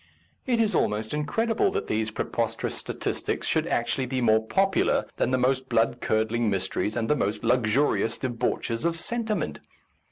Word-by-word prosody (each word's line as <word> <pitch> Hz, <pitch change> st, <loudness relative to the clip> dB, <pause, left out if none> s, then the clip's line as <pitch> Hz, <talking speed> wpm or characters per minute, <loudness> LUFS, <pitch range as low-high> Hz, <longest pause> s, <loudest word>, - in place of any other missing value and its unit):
It 240 Hz, -2 st, +2 dB
is 220 Hz, -2 st, +2 dB
almost 110 Hz, +3 st, 0 dB
incredible 225 Hz, -, +1 dB
that 420 Hz, -, -1 dB
these 110 Hz, 0 st, -1 dB
preposterous 110 Hz, -, -2 dB
statistics -, -, -3 dB
should -, -, +1 dB
actually 120 Hz, +2 st, 0 dB
be 130 Hz, +1 st, -1 dB
more 110 Hz, -2 st, +3 dB
popular 195 Hz, +11 st, +2 dB
than -, -, +1 dB
the 130 Hz, -, +2 dB
most 130 Hz, +1 st, +1 dB
blood 115 Hz, 0 st, +1 dB
curdling 110 Hz, +1 st, +1 dB
mysteries 95 Hz, +2 st, -1 dB
and 115 Hz, -2 st, -1 dB
the 150 Hz, -, +3 dB
most 105 Hz, -6 st, -1 dB
luxurious 120 Hz, 0 st, +2 dB
debauches 115 Hz, -2 st, -2 dB
of 170 Hz, 0 st, +1 dB
sentiment. 220 Hz, +5 st, -2 dB
125 Hz, 155 wpm, -26 LUFS, 110-165 Hz, -, more